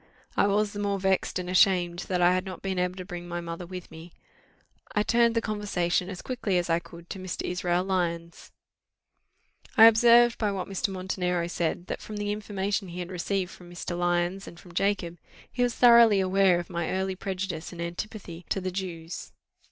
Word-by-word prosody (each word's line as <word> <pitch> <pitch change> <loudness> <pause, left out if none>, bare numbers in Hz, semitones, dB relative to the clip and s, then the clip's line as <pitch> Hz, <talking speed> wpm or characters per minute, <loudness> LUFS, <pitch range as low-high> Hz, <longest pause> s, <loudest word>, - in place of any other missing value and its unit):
I - - +3
was 205 +1 +1
the 205 - -5
more 200 -1 -1
vexed 190 -1 +1
and 180 -1 -4
ashamed 180 -1 +3
that 180 -2 +1
I 175 +1 +6
had 185 0 0
not 185 -2 -8
been 190 -1 -1
able 180 0 0
to 185 -1 -7
bring 175 -1 -7
my 175 0 -3
mother 170 +1 -6
with 180 -1 -8
me. 160 +2 -11 0.8
I 210 - +3
turned 235 +1 +3
the 230 - +2
conversation 195 -5 -1
as 185 -3 -7
quickly 230 -7 -1
as 175 -1 0
I 165 - +3
could 170 0 -13
to 195 - -5
Mr. 185 -1 -5
Israel 180 0 0
Lyons. 170 -3 -3 1.3
I 225 - +10
observed, 235 +1 +6
by 210 -2 +1
what 190 -2 -4
Mr. 195 +2 -2
Montenero 185 -2 -1
said, 175 0 -2
that - - -5
from 215 - -7
the 205 0 -2
information 205 -1 -2
he 175 0 -8
had 180 0 -5
received 185 +1 -2
from 175 -1 -13
Mr. 175 0 -5
Lyons 175 +2 0
and 170 - -11
from 180 -3 -15
Jacob, 180 -3 -1 0.3
he 250 - -3
was 245 -1 +1
thoroughly 235 -4 +7
aware 190 -1 +4
of 175 - -6
my 170 -2 -2
early 190 0 -1
prejudices 185 -3 -4
and 175 - -10
antipathy 175 0 -6
to - - 0
the 185 0 -3
Jews. 175 -3 -6
185 Hz, 200 wpm, -27 LUFS, 175-200 Hz, 1.3 s, I